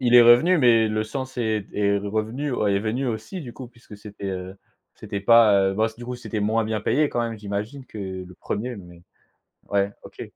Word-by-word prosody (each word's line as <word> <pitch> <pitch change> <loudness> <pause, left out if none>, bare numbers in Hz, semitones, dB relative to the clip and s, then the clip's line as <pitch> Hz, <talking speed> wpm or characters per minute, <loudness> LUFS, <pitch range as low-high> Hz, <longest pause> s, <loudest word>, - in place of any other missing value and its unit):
il 125 -1 +2
est 120 - +10
revenu 125 +10 +6
mais 115 -4 +5
le 110 0 -1
sens 130 +3 -6
est 110 -2 0
d - - -23
est 100 -1 +2
revenu 110 +7 -3
ouais, 100 -4 +1
est - - +2
venu 120 +5 -2
aussi 125 - -4
du 120 -5 -8
coup 130 - -9
puisque 115 -4 -15
c'était, 100 -1 -9
heu, 95 +1 -6 0.4
c'était 100 - -6
pas 110 -2 +6
heu, - - -4
bah, 110 +2 +2
s 110 - -8
du 120 - -9
coup 125 - -4
c'était 110 -3 -5
moins 110 +2 +1
bien 110 -1 -2
payé 145 +7 +2
quand 120 - -2
même 115 -2 -3
j'imagine 105 +6 -5
que 110 - -10
le 95 -2 -6
1er 120 +6 -4
mais 85 -2 -13 0.7
ouais, 100 0 +1
OK. - - -10
110 Hz, 225 wpm, -24 LUFS, 100-120 Hz, 0.7 s, est